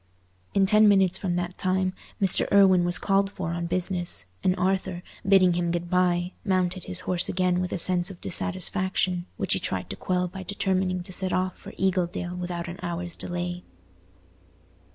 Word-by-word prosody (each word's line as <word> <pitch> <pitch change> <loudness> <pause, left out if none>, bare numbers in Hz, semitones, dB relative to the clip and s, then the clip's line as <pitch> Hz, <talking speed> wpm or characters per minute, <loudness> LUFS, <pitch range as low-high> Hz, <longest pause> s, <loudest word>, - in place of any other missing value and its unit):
In 195 -1 +4
ten 215 +2 +5
minutes 195 -3 +4
from 180 -3 -2
that 175 +1 -4
time, 185 0 +1 0.3
Mr. 195 -2 +2
Irwine 190 -3 +5
was 175 0 +1
called 195 0 +1
for 165 -4 -5
on 170 0 -3
business, 175 - -1 0.2
and 185 - +2
Arthur, 185 -1 -1 0.2
bidding 190 -2 +5
him 170 0 -1
good 175 +1 -3
bye, 180 -1 +1
mounted 185 -2 0
his 185 -1 -2
horse 180 -1 0
again 180 -1 +1
with 180 - -3
a - - -1
sense 180 +1 +3
of 185 -3 -10
dissatisfaction, 185 0 +1
which - - 0
he - - 0
tried - - -2
to - - -4
quell 180 -1 -1
by 190 +2 -8
determining 190 -1 -1
to 185 - -10
set 185 0 +2
off 185 0 -1
for - - -11
Eagledale 180 -1 -1
without 175 -1 -4
an 175 +1 -8
hour's 175 0 -4
delay. 175 0 -4
180 Hz, 175 wpm, -26 LUFS, 175-190 Hz, 0.3 s, ten